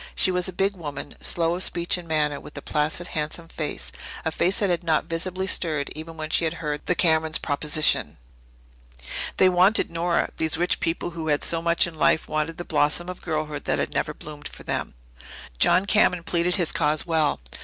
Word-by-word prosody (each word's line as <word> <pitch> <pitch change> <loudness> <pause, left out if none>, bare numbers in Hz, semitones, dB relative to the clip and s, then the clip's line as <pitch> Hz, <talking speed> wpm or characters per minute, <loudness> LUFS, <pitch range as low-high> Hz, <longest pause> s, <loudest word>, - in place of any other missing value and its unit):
She 185 - +5
was 180 0 +1
a - - -5
big 195 +2 0
woman, 145 -5 -6
slow 165 -1 +1
of 180 - -3
speech 175 -2 0
and 175 -2 -6
manner, 150 -2 0
with - - -12
a - - -5
placid, 155 +3 -1
handsome 155 +2 -4
face 155 -2 -5 0.3
a 160 - 0
face 180 +4 +1
that 200 -3 +1
had 175 0 -1
not 160 -2 +1
visibly 185 +3 -3
stirred 155 -6 0
even 160 +1 -8
when 155 0 -5
she - - +3
had 165 0 -1
heard 150 -2 -4
the 180 - +2
Camerons' 160 -2 +3
proposition. 150 +1 +2 1.2
They 190 - +6
wanted 185 +3 +4
Nora 170 +1 0
these 160 0 0
rich 175 +2 +1
people 165 +1 -2
who 165 -2 -5
had 145 -1 +1
so 165 -1 +3
much 170 0 +3
in 170 - -6
life 155 0 +2
wanted 155 +2 -2
the 175 - -6
blossom 150 +3 +1
of 180 - -7
girlhood 155 -3 -3
that - - +1
had - - -2
never - - -1
bloomed 150 -1 -8
for - - -12
them. - - -3 0.6
John 185 +2 +5
Cameron 185 -4 +3
pleaded 175 +1 +1
his 175 -5 0
cause 150 +1 0
well. 160 - +1
165 Hz, 200 wpm, -24 LUFS, 155-175 Hz, 1.2 s, They